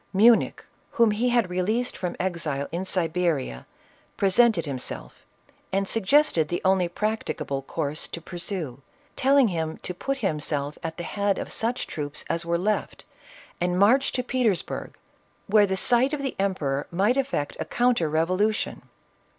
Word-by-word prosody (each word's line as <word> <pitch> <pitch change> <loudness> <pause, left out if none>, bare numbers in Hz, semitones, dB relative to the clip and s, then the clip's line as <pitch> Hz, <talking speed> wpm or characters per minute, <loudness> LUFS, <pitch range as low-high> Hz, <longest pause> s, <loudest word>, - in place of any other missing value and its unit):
Munich, 225 +4 +4 0.3
whom 230 -2 +4
he 230 +4 +1
had 235 -7 +2
released 215 +8 0
from 180 -2 -4
exile 165 -6 -2
in 175 +3 -3
Siberia, 165 - -1 0.5
presented 200 -2 +4
himself 135 -4 -6 0.4
and 195 +1 0
suggested 225 - +3
the 175 - -2
only 190 -2 +3
practicable 175 -8 -2
course 145 +2 -3
to - - -6
pursue, 170 -6 -5 0.3
telling 270 -2 +4
him 160 -3 -3
to 180 - -3
put 275 +9 -3
himself 150 - -1
at 160 0 -5
the 175 - -4
head 200 +2 0
of - - -5
such 235 +2 0
troops 145 -1 -4
as 165 - +1
were 170 0 0
left 210 +4 -2 0.6
and 180 0 +1
march 240 +8 +4
to 250 - -1
Petersburg, 240 -7 -1 0.5
where 205 0 +4
the 190 0 -1
sight 250 +7 +3
of 285 -2 -2
the 270 - -2
emperor 150 -8 -1
might 200 +8 +2
effect 265 - -1
a - - -2
counter 240 -10 +1
revolution. 185 +8 0
185 Hz, 150 wpm, -25 LUFS, 160-225 Hz, 0.6 s, Munich